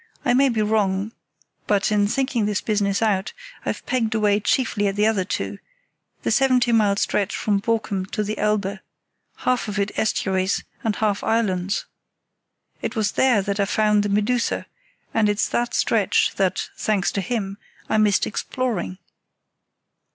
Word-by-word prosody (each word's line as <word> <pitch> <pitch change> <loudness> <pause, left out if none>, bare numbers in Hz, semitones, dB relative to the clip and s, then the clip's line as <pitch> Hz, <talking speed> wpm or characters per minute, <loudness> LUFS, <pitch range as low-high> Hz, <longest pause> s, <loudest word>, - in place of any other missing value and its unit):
I 245 - +3
may 270 +2 +4
be 220 -3 +1
wrong, 210 -1 0 0.6
but, 205 0 +2
in 205 -1 +3
thinking 240 -2 0
this 210 -1 0
business 200 -1 0
out, 200 -2 0 0.3
I've - - -3
pegged 225 -3 0
away 210 -1 +3
chiefly 210 -2 +1
at 195 - -1
the 210 +1 +2
other 215 -4 +2
two, 190 - -4 0.6
the - - 0
seventy 255 -3 +3
mile 210 -3 +3
stretch 200 -1 0
from 205 -2 +1
Borkum 205 -3 -1
to 210 +2 -2
the 210 +1 -3
Elbe—half 210 +4 -3
of 205 -1 -4
it 200 0 0
estuaries, 190 -3 0 0.2
and 220 -2 0
half 210 -2 0
islands. 200 -3 0 1.0
It - - -3
was 215 -2 +1
there 245 -7 +3
that 200 +1 -2
I 200 - +3
found 210 0 +2
the 205 - -1
Medusa, 210 +4 0 0.5
and 215 -2 +3
it's 205 0 +1
that 240 0 -1
stretch 215 -5 +2
that, 190 -2 0
thanks 205 -4 0
to 200 - -2
him, 200 -3 -3 0.3
I 220 - +2
missed 210 -2 +3
exploring." 215 - -3
210 Hz, 155 wpm, -23 LUFS, 200-225 Hz, 1.0 s, may